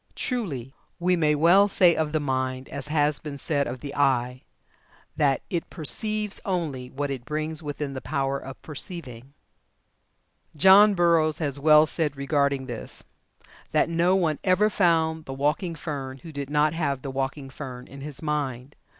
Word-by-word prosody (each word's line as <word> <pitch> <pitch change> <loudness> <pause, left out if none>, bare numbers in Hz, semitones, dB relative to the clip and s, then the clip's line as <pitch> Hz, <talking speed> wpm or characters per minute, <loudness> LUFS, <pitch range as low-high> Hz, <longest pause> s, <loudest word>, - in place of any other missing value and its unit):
Truly, 145 - -3 0.3
we 180 +1 +2
may 155 -3 +2
well 175 +7 +5
say 180 -4 +4
of 155 -1 -1
the 155 - +1
mind, 130 -2 -2
as 140 0 -5
has 150 -1 +1
been 145 -2 -7
said 140 -1 0
of 125 0 -6
the 140 -1 -7
eye, 130 -2 +1 0.7
that 145 -4 +1
'it 170 -2 -2
perceives 210 +6 0
only 155 -10 -3
what 140 +2 -3
it 130 -3 -5
brings 155 +3 -3
within 145 -2 -4
the 130 - -6
power 135 0 -1
of 135 - -10
perceiving.'" 140 -4 -8 1.2
John 195 +6 +7
Burroughs 165 -3 +3
has 145 -3 -2
well 150 +1 +6
said 150 -3 -2
regarding 140 -1 0
this 120 -3 -6 0.7
that - - +3
"No 170 +3 +2
one 165 -6 +1
ever 200 +3 +3
found 160 -4 +2
the 135 - -6
walking 150 +5 -1
fern 140 -4 -5
who 165 - -9
did 140 -2 -5
not 150 +1 +2
have 140 -5 -2
the 135 - -4
walking 135 +1 -3
fern 130 -3 -8
in 140 +1 -11
his 145 0 -6
mind. 140 -3 -3
150 Hz, 165 wpm, -25 LUFS, 135-165 Hz, 1.2 s, John